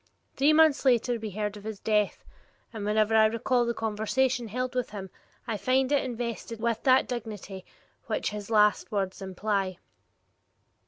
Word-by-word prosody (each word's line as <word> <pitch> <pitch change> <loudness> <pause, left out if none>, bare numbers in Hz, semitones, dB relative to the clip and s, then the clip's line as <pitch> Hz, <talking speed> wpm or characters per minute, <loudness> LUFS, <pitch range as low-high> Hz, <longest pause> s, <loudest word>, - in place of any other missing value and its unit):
Three 285 +3 +4
months 315 -2 +5
later 245 -2 +2
we 220 -1 -5
heard 210 +1 -3
of 205 - -12
his 215 -2 -6
death, 210 -1 0 0.5
and 215 -2 -5
whenever 215 +1 +2
I 220 0 +6
recall 235 +2 +1
the 235 - 0
conversation 230 +3 0
held 250 +4 -3
with 250 -1 -1
him, 195 -3 -8 0.3
I 225 -3 -2
find 255 +6 +1
it 285 - +3
invested 235 -2 -5
with 230 0 -1
that 260 0 +5
dignity 210 -5 -6 0.4
which - - -2 0.2
last 210 -2 +3
words 195 -2 -2
imply. 195 -1 -2
220 Hz, 155 wpm, -28 LUFS, 210-245 Hz, 0.5 s, I